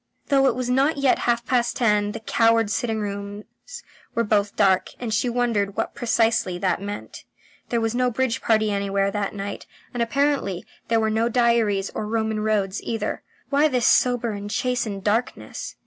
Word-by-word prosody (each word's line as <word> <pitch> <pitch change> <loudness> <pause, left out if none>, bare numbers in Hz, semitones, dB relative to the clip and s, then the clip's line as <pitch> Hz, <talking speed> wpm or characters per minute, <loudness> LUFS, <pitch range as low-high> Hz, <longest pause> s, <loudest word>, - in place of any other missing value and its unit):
Though 275 -2 +4
it 250 - +1
was 255 -1 -3
not 270 +5 +2
yet 275 -2 +2
half 235 0 +1
past 245 -3 +1
ten 210 -3 +2
the - - -5
cowards' 225 -1 +2
sitting 225 -2 -1
rooms 200 0 -5 0.7
were 230 - +2
both 205 -2 +1
dark, 190 -2 +3
and 235 -3 -3
she 240 +3 +1
wondered 230 -5 0
what - - -2
precisely 225 -6 +1
that 185 0 0
meant. 205 +1 -7 0.5
There 235 - +1
was 225 0 -1
no 250 0 +1
bridge 245 0 -1
party 220 -2 +2
anywhere 200 0 0
that 205 0 -3
night, 200 0 -6 0.3
and 245 - -2
apparently 275 -6 0 0.2
there 230 -1 +2
were 220 -1 +1
no 225 +2 +1
diaries 230 -5 +2
or 210 - -4
Roman 220 -1 -1
roads 210 -2 0
either. 225 -2 -3 0.3
Why 285 +2 +4
this 250 -5 0
sober 245 -2 +3
and 205 0 -6
chastened 225 -4 -2
darkness. 220 +4 -2
225 Hz, 175 wpm, -23 LUFS, 205-245 Hz, 0.7 s, Though